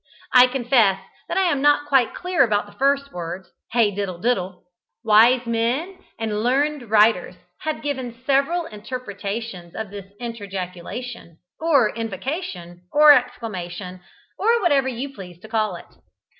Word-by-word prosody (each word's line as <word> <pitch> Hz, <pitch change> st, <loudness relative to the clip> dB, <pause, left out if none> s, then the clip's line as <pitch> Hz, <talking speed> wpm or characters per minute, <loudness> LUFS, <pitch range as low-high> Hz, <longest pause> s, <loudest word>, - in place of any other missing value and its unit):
I 250 Hz, 0 st, +8 dB
confess 240 Hz, -6 st, +2 dB, 0.3 s
that -, -, -2 dB
I 385 Hz, -, +4 dB
am 335 Hz, -7 st, +1 dB
not 290 Hz, 0 st, +3 dB
quite 265 Hz, -4 st, +3 dB
clear 360 Hz, -5 st, +2 dB
about 210 Hz, -4 st, +1 dB
the 205 Hz, -, -15 dB
first 280 Hz, +5 st, 0 dB
words, 175 Hz, +2 st, -6 dB, 0.2 s
"Hey 230 Hz, -3 st, +3 dB
diddle 195 Hz, -3 st, -4 dB
diddle!" 185 Hz, -3 st, -1 dB, 0.4 s
Wise 235 Hz, +3 st, +5 dB
men 245 Hz, +11 st, -1 dB, 0.2 s
and 215 Hz, -2 st, -2 dB
learned 270 Hz, +1 st, 0 dB
writers 210 Hz, -4 st, +3 dB, 0.2 s
have 310 Hz, -1 st, -4 dB
given 260 Hz, -5 st, -4 dB
several 285 Hz, +6 st, +1 dB
interpretations 205 Hz, -, -6 dB
of 220 Hz, -3 st, -5 dB
this 200 Hz, -1 st, -9 dB
interjaculation, 200 Hz, -2 st, -6 dB, 0.2 s
or 285 Hz, -9 st, +3 dB
invocation, 200 Hz, -, -5 dB
or 300 Hz, 0 st, +8 dB
exclamation, 190 Hz, -8 st, -3 dB, 0.4 s
or 460 Hz, +3 st, +3 dB
whatever 280 Hz, -6 st, +3 dB
you 265 Hz, +2 st, -4 dB
please 180 Hz, -7 st, -11 dB
to 220 Hz, -, -11 dB
call 215 Hz, -4 st, 0 dB
it. 170 Hz, -, -10 dB
230 Hz, 140 wpm, -22 LUFS, 195-275 Hz, 0.4 s, I